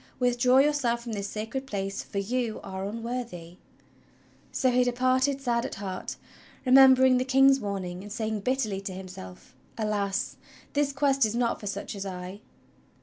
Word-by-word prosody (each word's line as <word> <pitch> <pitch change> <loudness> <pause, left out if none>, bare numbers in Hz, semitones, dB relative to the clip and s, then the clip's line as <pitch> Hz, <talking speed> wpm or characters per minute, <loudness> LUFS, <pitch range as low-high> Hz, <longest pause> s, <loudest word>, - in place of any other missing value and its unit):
Withdraw 250 +1 +4
j^ourself 265 -6 +1
from 235 -1 -7
this 200 -1 -3
sacred 225 +6 -5
place, 195 -3 -3
for - - -8
you 230 +3 -1
are 190 +1 -5
unworthy! 225 -6 -5 0.5
" - - -33 0.3
So 260 -2 +2
he 250 0 +4
departed 255 +3 +1
sad 235 -3 0
at - - -5
heart, 190 -2 -5 0.5
remembering 260 0 +7
the 250 - +1
King's 270 +1 +5
warning, 190 -4 -4
and 205 +1 -10
saying 220 0 -2
bitterly 215 -3 -1
to 195 -1 -5
himself: 180 - -10 0.2
"Alas! 205 -3 -1 0.4
this 290 -1 +1
Quest 275 -1 +2
is 220 0 +1
not 235 -1 0
for 205 - -7
such 200 0 -4
as 195 - -5
I!" 185 +2 -7
230 Hz, 160 wpm, -27 LUFS, 200-255 Hz, 0.5 s, remembering